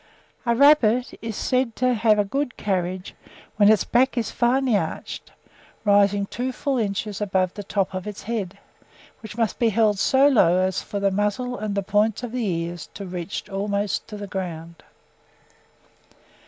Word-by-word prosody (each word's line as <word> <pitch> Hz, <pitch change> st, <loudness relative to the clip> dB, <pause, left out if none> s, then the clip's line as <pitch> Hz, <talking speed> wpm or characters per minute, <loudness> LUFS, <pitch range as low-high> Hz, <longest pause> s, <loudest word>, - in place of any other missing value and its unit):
A 235 Hz, -, +3 dB
rabbit 255 Hz, -3 st, +4 dB
is 225 Hz, -2 st, -5 dB
said 255 Hz, -1 st, 0 dB
to 255 Hz, 0 st, +2 dB
have 220 Hz, -2 st, +3 dB
a 205 Hz, -, +2 dB
good 270 Hz, +4 st, -3 dB
carriage 185 Hz, -2 st, -2 dB, 0.4 s
when 205 Hz, 0 st, +6 dB
its 215 Hz, -, +3 dB
back 255 Hz, +2 st, +2 dB
is 230 Hz, -3 st, -1 dB
finely 250 Hz, 0 st, +2 dB
arched, 200 Hz, -, -4 dB, 0.5 s
rising 200 Hz, 0 st, +4 dB
full 250 Hz, +5 st, -3 dB
two 265 Hz, 0 st, -1 dB
inches 205 Hz, 0 st, -3 dB
above 190 Hz, -3 st, 0 dB
the 205 Hz, -, -6 dB
top 195 Hz, -1 st, -2 dB
of 185 Hz, +1 st, -5 dB
its 210 Hz, -, -7 dB
head, 210 Hz, -5 st, -4 dB, 0.6 s
which 220 Hz, 0 st, -10 dB
must 225 Hz, -2 st, -1 dB
be 235 Hz, -2 st, +3 dB
held 215 Hz, -2 st, +2 dB
so 270 Hz, +6 st, +4 dB
low 185 Hz, -11 st, +4 dB
as 185 Hz, 0 st, 0 dB
for 205 Hz, -, -5 dB
the 200 Hz, 0 st, +1 dB
muzzle 210 Hz, +5 st, -1 dB
and 210 Hz, -3 st, -4 dB
the 200 Hz, -, 0 dB
points 210 Hz, +4 st, +1 dB
of 245 Hz, -, -4 dB
the 250 Hz, 0 st, -2 dB
ears 170 Hz, -3 st, -3 dB
to 200 Hz, -, -6 dB
reach 180 Hz, +1 st, -5 dB
almost 200 Hz, 0 st, -2 dB
to 210 Hz, -, -8 dB
the 205 Hz, -, -6 dB
ground." 170 Hz, -4 st, -6 dB
210 Hz, 170 wpm, -23 LUFS, 195-235 Hz, 0.6 s, when